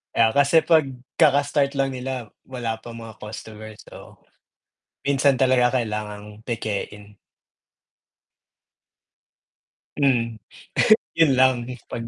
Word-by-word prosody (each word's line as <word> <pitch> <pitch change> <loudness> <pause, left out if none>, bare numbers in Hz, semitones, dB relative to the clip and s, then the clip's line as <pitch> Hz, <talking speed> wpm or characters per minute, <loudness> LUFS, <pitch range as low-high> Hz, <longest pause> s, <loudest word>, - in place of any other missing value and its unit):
Ah, 115 -1 +4
kasi 140 +4 +4
'pag 160 -4 +4 0.3
kaka-start 145 0 +3
lang 135 0 0
nila 125 -3 -5 0.2
wala 120 -4 -4
pa 115 0 -10
mga 115 -2 -11
customer, 110 0 -9
so - - -14 0.9
minsan 140 0 +3
talaga 130 -1 +3
kailangang 105 -1 -6
pekein. 105 -2 -5 2.8
Hmm, 120 -5 +1 0.8
yun 165 -3 +4
lang 130 -2 +3 0.2
pag. 115 - -5
120 Hz, 95 wpm, -23 LUFS, 110-135 Hz, 2.8 s, Ah